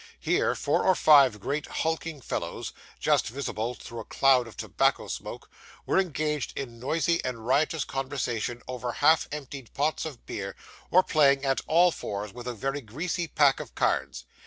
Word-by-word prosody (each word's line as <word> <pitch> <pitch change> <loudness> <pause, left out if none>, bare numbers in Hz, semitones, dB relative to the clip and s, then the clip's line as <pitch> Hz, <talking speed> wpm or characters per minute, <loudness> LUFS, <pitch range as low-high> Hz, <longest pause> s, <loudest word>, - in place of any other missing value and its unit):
Here, - - +1
four - - +1
or 185 - +4
five 140 -10 +6
great 145 +8 -3
hulking 160 -2 -2
fellows, - - -4 0.3
just - - +2
visible 120 -2 -3
through 115 -1 -9
a - - -5
cloud 130 -1 +3
of 115 - -13
tobacco - - +1
smoke, - - -6 0.4
were - - +2
engaged 150 -6 -2
in 120 -4 -6
noisy 165 +6 0
and 115 -3 -4
riotous 150 +4 +2
conversation 125 -3 -3
over 125 -1 -4
half 155 +2 +4
emptied 140 -4 -7
pots 150 +4 0
of 145 -6 -8
beer, 100 -1 -5 0.3
or 185 +2 +5
playing 140 -4 +3
at 135 -1 +1
all 175 +3 +5
fours 100 -7 -5
with 120 +1 -9
a 125 - -2
very 135 +5 -3
greasy 165 - -3
pack 145 -3 +3
of - - -9
cards. - - 0
135 Hz, 165 wpm, -27 LUFS, 120-155 Hz, 0.4 s, five